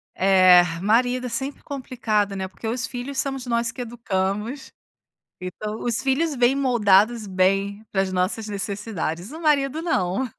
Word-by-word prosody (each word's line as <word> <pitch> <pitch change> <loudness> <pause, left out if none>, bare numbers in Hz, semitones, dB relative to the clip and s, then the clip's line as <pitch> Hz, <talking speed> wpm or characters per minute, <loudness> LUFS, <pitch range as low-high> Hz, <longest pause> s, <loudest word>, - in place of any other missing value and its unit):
É, 185 -2 +6 0.2
marido 245 +5 +2
é - - -3
sempre 265 +5 -4
complicado, 220 -7 -2
né, 190 -1 -3
porque 190 +4 -8
os 245 +2 -1
filhos 260 +2 -6
somos 270 -2 -2
nós 235 -1 0
que 250 - -7
educamos, 225 +1 -3 0.7
então, 210 +4 -5
os 235 -2 0
filhos 285 +3 +1
vêm 245 +1 +3
moldados 230 -4 +3
bem 195 +2 0
para 195 - +1
as 190 - -2
nossas 185 +4 -1
necessidades, 200 - -4
o 315 - -8
marido 295 -1 +1
não. 200 - 0
225 Hz, 150 wpm, -23 LUFS, 195-255 Hz, 0.7 s, É